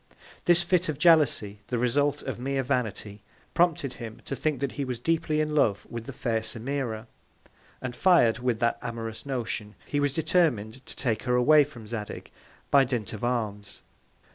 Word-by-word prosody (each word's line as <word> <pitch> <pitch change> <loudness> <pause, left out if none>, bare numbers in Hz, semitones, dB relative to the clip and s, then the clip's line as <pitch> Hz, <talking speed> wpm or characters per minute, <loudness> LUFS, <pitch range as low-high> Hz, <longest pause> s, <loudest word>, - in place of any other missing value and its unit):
This 175 0 +5
Fit 180 -2 +2
of 150 - -2
Jealousy, 145 - +4
the 125 - -1
Result 145 +5 +1
of 130 -3 -4
mere 135 +1 -1
Vanity, 110 -6 -2 0.3
prompted 165 -6 +2
him 115 -2 -8
to 135 - -3
think 150 +2 -1
that 140 -2 -1
he 145 - -3
was 125 -2 -3
deeply 155 +3 0
in 155 0 0
Love 110 -9 +2
with 115 -1 -6
the - - -4
fair 115 -3 -1
Semira; 115 0 -3 0.8
and 125 -1 -4
fir'd 125 -12 +4
with 125 -2 0
that 115 0 +1
amorous 115 +1 -5
Notion, 115 -5 -3
he 145 - -1
was 145 -1 +2
determin'd 135 - +1
to - - -7
take 115 -5 -1
her 125 -1 0
away 150 +5 +6
from 125 -6 -11
Zadig, 105 -1 -6 0.4
by 140 -1 +7
Dint 120 -6 -3
of 110 - -7
Arms. 110 -5 -3
125 Hz, 175 wpm, -27 LUFS, 115-145 Hz, 0.8 s, by